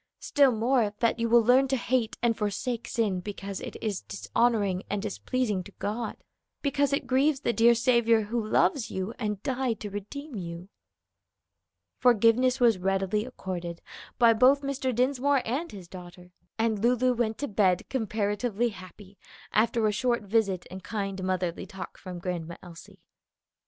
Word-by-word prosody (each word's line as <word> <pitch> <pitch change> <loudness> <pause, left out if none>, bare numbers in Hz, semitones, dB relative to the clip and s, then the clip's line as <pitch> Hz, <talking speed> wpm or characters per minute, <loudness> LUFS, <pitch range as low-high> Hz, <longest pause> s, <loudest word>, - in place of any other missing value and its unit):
Still 280 -2 +3
more, 230 -2 +1
that 230 0 +1
you 230 0 0
will 235 0 +6
learn 255 +4 +5
to 265 - +1
hate 240 -2 -1
and 235 -1 +3
forsake 225 +3 -3
sin 210 -6 0
because 195 0 -6
it - - -7
is 210 -4 -2
dishonoring 205 -4 0
and 205 - -1
displeasing 210 0 -2
to - - -11
God, 220 +2 -4 0.5
because 285 -1 +1
it 280 -1 0
grieves 265 +2 +2
the 235 - 0
dear 235 +2 +5
Saviour 235 -1 +3
who 225 +2 -2
loves 235 +4 +1
you 190 +4 -4
and 210 -3 -3
died 255 -4 -1
to 205 - -5
redeem 275 +9 -7
you." 175 -1 -7 1.3
Forgiveness 245 +2 +4
was 230 -6 +4
readily 195 +3 0
accorded 180 -8 -6 0.4
by 235 -2 +6
both 260 +5 +4
Mr. 275 -1 -1
Dinsmore 260 +2 +1
and 275 +9 -2
his 190 -4 -10
daughter, 180 0 -12 0.3
and 225 -2 +1
Lulu 250 +2 +3
went 225 -2 -1
to 285 - -3
bed 190 -4 +1
comparatively 220 -1 -1
happy 190 0 -13 0.3
after 225 +1 +2
a 215 - +3
short 235 +2 0
visit 200 -3 0
and 190 0 -8
kind 195 -2 -4
motherly 185 -2 -2
talk 190 -1 -9
from 185 -2 -7
Grandma 170 -2 -4
Elsie. 170 -2 -13
220 Hz, 155 wpm, -28 LUFS, 195-245 Hz, 1.3 s, will